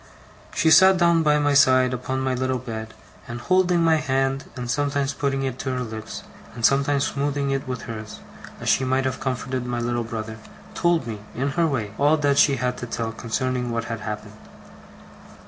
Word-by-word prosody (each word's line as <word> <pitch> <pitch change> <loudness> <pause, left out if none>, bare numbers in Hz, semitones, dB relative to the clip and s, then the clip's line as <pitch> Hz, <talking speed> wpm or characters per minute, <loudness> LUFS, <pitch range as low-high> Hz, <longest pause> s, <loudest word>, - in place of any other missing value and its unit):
She 160 - +3
sat 190 +2 +7
down 170 -1 +4
by 150 -1 +3
my 145 -1 +2
side 130 -3 +5
upon 130 +1 -3
my 130 0 0
little 130 +1 -1
bed; 110 -3 -7 0.3
and 120 0 -6
holding 180 +2 +2
my 165 -1 +4
hand, 135 -1 0
and 125 -2 -5
sometimes 140 +2 0
putting 135 -1 -1
it 130 -1 -3
to 135 - -3
her 125 0 -2
lips, 110 -1 -7 0.3
and 115 -2 0
sometimes 140 +1 +3
smoothing 140 0 -1
it 135 -1 -2
with 125 -2 -4
hers, 110 -1 -7 0.4
as - - -7
she - - +3
might 130 +1 +1
have 130 - -2
comforted 130 0 -3
my 120 -1 -3
little 120 0 -1
brother, 110 -1 -6 0.3
told 170 -5 +1
me, 110 -3 -5 0.2
in 135 +4 -1
her 165 +4 +2
way, 110 -8 -2
all 145 +3 +4
that 145 -2 +2
she 140 - +5
had 125 0 -2
to 125 - -5
tell 115 -1 -3
concerning 125 +2 -2
what 115 0 -2
had 115 -1 -4
happened. 105 0 -6
130 Hz, 195 wpm, -23 LUFS, 120-140 Hz, 0.4 s, sat